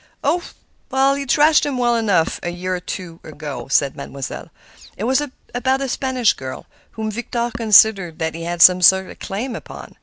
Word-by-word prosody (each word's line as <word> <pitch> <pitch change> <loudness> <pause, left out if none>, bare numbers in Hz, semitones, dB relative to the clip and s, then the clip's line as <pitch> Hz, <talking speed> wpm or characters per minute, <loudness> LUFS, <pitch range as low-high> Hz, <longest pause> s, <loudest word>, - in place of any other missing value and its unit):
"Oh! 355 - +2 0.7
he 280 0 -4
thrashed 300 +4 +4
him 280 -3 -2
well 240 -1 +2
enough 205 -8 +1
a 175 - -3
year 180 +1 -3
or - - -4
two 180 -2 -7
ago," 145 -4 -7
said 140 0 +1
Mademoiselle. 140 -2 -7 0.5
"It 200 - -5
was 260 +4 +2 0.3
about 260 +2 0
a 275 - -2
Spanish 255 -2 +1
girl, 130 -1 -8 0.3
whom 220 -1 -4
Victor 240 +1 -3
considered 205 -6 +4
that 160 0 -2
he 165 - -7
had 170 0 +2
some 180 0 +7
sort 190 +1 +5
of - - -14
claim 230 +5 -4
upon. - - -10
200 Hz, 180 wpm, -20 LUFS, 170-245 Hz, 0.7 s, some